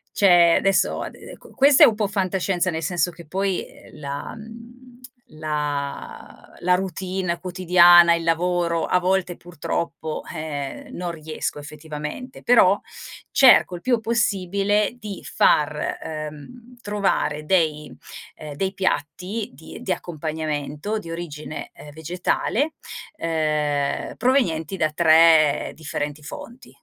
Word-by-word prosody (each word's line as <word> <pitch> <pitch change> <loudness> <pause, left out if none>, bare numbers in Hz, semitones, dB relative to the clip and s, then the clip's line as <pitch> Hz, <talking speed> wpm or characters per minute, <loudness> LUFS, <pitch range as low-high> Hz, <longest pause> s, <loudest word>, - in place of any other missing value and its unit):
c'è 175 -4 +6
adesso 195 0 +1
ade - - -9
ecco, - - -14
questa 275 0 +6
è - - +10
un 220 - +1
po' 210 -2 0
fantascienza, 190 -1 -1
nel 160 -1 -3
senso 175 +1 0
che 170 +1 -13
poi, 190 +3 -2
ehm, - - -16
la 140 -1 -6
mhmm, 235 +3 -13 0.4
la 150 -2 -5
la 180 +1 +3
routine 185 -1 -3
quotidiana, 175 -1 +6
il 165 - -4
lavoro 170 0 +1
a 180 - +2
volte 180 -1 0
purtroppo, 165 -1 -4
eh, 145 -3 -5
non 175 -1 -4
riesco 155 -2 -5
effettivamente, 150 - -8
però 205 -5 +5 0.5
cerco 250 -8 +6
il 175 - -9
più 245 -3 +1
possibile 205 -1 0
di 210 -4 -7
far, 150 0 +1
uhm, 155 - -8
trovare 195 -7 -1
dei 155 -4 0 0.4
ehm, 150 -2 -9
dei 190 +5 -2
piatti 190 +4 -2
di 160 +5 -11
di 185 - 0
accompagnamento 155 +3 -4
di 170 -5 -10
origine, 155 -3 -7
ehm, 150 - -12
vegetale, 180 - -1 0.4
uhm, 150 - -1
provenienti 195 - +1
da 155 -3 0
3 160 -2 +5
differenti 150 -1 -5
fonti, 235 - -10
175 Hz, 125 wpm, -22 LUFS, 155-195 Hz, 0.5 s, è